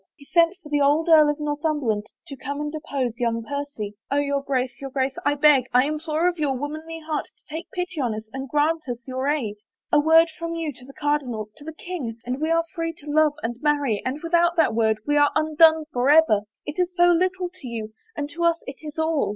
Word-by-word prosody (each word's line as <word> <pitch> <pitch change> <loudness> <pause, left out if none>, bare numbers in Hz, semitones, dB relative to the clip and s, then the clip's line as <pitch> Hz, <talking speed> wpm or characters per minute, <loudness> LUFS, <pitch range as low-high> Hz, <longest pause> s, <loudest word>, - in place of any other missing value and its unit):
He 285 - -17
sent 335 +3 +3
for 295 - -11
the 295 -1 +1
old 295 +4 +3
Earl 310 -2 +7
of 295 - -1
Northumberland 295 -8 -1 0.2
to 280 - -8
come 280 +2 -5
and 295 0 -3
oppose 280 -6 -2
young 230 -1 0
Percy. 280 -5 -5 0.2
Oh, 280 - +1
your 280 -1 0
Grace, 255 -2 -2
your 275 - -5
Grace, 265 0 -1
I 290 0 +2
beg, 290 -3 +5
I 250 +2 +6
implore 310 +2 -1
of 350 -2 -1
your 280 -4 0
wom 290 +3 -4
anly 325 +1 -8
heart 310 -1 -2
to - - -18
take 320 +3 -7
pity 355 -4 -3
on 235 -4 0
us 215 0 -7
and 270 0 -5
grant 305 +1 +1
us 240 +1 -6
your 260 +1 -2
aid! 235 -9 -1 0.3
A 300 - +5
word 325 +2 +5
from 335 0 -3
you 325 -3 -3
to 250 0 -13
the 275 - -12
cardinal, 265 -8 -1
to - - -11
the 320 - -6
king, 300 -11 -5
and 255 +3 -3
we 315 - 0
are 330 0 +2
free 330 -2 -2
to 300 -2 -9
love 305 0 +4
and 240 +2 -4
marry 290 -8 +1
and 270 +5 -4
without 340 0 +2
that 320 -8 +3
word 220 -1 +2
we 295 0 +2
are 290 0 +5
undone 315 0 +4
forever. 260 -3 +5 0.2
It 295 +4 -5
is 360 0 0
so 350 0 +5
little 365 +1 +1
to 335 -8 -9
you 220 -2 -5 0.2
and 290 -1 -2
to 340 +4 -4
us 335 -1 +4
it 270 - -7
is 300 -1 -8
all. 320 -5 +1
295 Hz, 235 wpm, -24 LUFS, 260-320 Hz, 0.3 s, Earl